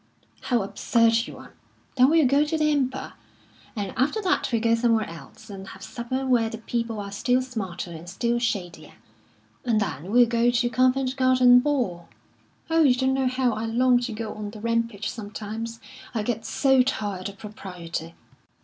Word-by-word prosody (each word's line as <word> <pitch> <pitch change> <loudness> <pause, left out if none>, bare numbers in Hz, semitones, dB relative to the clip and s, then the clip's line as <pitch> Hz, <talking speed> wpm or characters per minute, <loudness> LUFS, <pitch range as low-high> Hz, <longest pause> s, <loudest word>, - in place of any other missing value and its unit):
"How 240 -5 +1
absurd 230 +3 +2
you - - -9
are! - - -13 0.4
Then 255 0 +5
we'll 320 -1 +4
go 280 +3 +4
to 310 +2 -1
the 305 -1 +2
Empire. 265 -2 -1 0.6
And 200 -3 -4
after 270 - +1
that 370 -6 +1
we'll 230 - +2
go 230 +1 +2
somewhere 230 -2 +2
else, 165 +6 -12
and 195 -2 -9
have - - -11
supper 255 +3 -4
where 240 -3 +2
the 225 - -6
people 230 -1 -3
are 200 -1 -6
still 245 +5 +1
smarter 200 -9 -5
and 165 +1 -9
still 235 +5 0
shadier; 195 -7 -3 0.7
and 230 -3 +2
then 180 -3 -3
we'll 245 +1 +6
go 235 0 +2
to 240 0 +1
Covent 255 +1 +2
Garden 255 -1 +6
Ball. 245 - -1 0.6
Oh, 325 0 +4
you 270 -5 +5
don't 260 +1 +1
know 265 -1 +1
how 255 -1 +1
I 220 +1 -3
long 245 +2 +3
to 245 -1 -4
go 220 0 -5
on 210 -1 -6
the 215 +1 -10
rampage 230 -2 -1
sometimes! 220 +2 -6 0.4
I 215 - 0
get 225 0 -3
so 265 -2 +3
tired 205 -7 -2
of 200 - -12
propriety." 180 -6 -7
230 Hz, 180 wpm, -25 LUFS, 210-255 Hz, 0.7 s, we'll